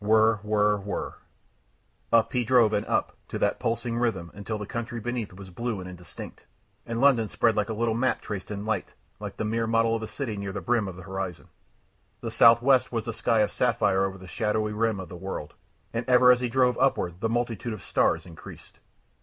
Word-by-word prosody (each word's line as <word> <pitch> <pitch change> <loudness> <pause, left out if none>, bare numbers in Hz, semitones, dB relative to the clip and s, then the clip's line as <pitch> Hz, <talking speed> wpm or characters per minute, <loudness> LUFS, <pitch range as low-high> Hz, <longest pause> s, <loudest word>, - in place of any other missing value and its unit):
Whirr, 110 +1 +4
whirr, 105 0 +2
whirr. 100 0 -4 1.0
Up 115 -1 +4
he 125 -1 +2
drove 120 -3 +4
and 105 - 0
up, - - 0
to - - -4
that - - 0
pulsating 115 +1 -1
rhythm, 95 -8 -1
until 100 +2 -4
the 105 - -5
country 115 +2 -4
beneath 120 -1 -3
was 95 0 -11
blue 115 +2 -3
and 90 - -7
indistinct, 90 -1 -10 0.4
and 115 0 -2
London 125 -5 +4
spread 115 +2 +2
like 105 0 0
a - - -1
little 115 +1 0
map 125 +3 +1
traced 100 -3 -6
in 105 0 -5
light, 110 - -2 0.2
like - - -7
the 110 - -2
mere 115 +1 0
model 115 0 +2
of 115 - -3
a 110 - -4
city 120 -4 -4
near 100 -1 -4
the 100 - -3
brim 120 -4 +1
of 95 - -6
the 90 - -10
horizon. 95 -2 -5 0.7
The - - -4
southwest 120 +3 +5
was 115 -1 -3
a 115 - -2
sky 115 0 +2
of 105 - +1
sapphire 100 -5 +2
over 95 0 -2
the 95 0 -12
shadowy 105 +2 -1
rim 110 -1 0
of 95 - -6
the - - -8
world, 90 -4 -6 0.4
and 115 +1 -1
ever 125 0 +7
as 125 - +4
he 125 -1 -1
drove 125 0 +2
upward 90 -10 +1
the 115 - +1
multitude 120 -1 -2
of 100 -5 -8
stars - - +1
increased. 85 -3 -13
110 Hz, 210 wpm, -27 LUFS, 100-120 Hz, 1.0 s, ever